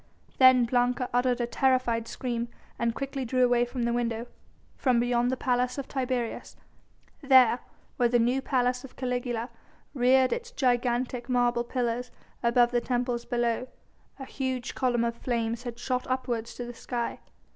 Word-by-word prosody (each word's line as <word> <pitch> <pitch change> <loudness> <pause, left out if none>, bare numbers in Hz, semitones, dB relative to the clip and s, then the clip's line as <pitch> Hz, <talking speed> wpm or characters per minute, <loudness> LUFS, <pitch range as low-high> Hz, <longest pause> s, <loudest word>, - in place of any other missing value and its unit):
Then 255 -2 +7
Blanca 245 +1 +1
uttered 245 0 +2
a - - +1
terrified 240 -2 +1
scream 240 -2 -3 0.3
and 235 -1 0
quickly 275 0 -4
drew 255 +1 +2
away 245 0 +3
from 245 0 -4
the 235 0 +1
window; 235 -1 -1 0.5
from 250 -3 +2
beyond 240 0 +1
the 260 - -1
Palace 250 0 0
of 275 - -4
Tiberius, 255 -3 -3 0.7
there 260 -4 +6 0.4
where 240 -1 +3
the 240 - +3
new 245 +3 +2
Palace 250 -1 0
of 270 - -12
Caligula 245 -2 -3 0.4
reared 260 0 +4
its 475 0 -5
gigantic 245 - 0
marble 245 -1 +2
pillars 245 0 -2 0.3
above 240 0 +3
the 240 -1 +1
temples 245 -1 -1
below, 240 +1 -1 0.5
a 270 - -7
huge 260 -2 -3
column 245 -2 +1
of 235 0 -2
flames 230 -1 -2
had 240 -2 -6
shot 250 0 -2
upwards 245 -3 -2
to 245 - -5
the 240 - -7
sky. 235 0 -4
245 Hz, 155 wpm, -28 LUFS, 240-255 Hz, 0.7 s, Then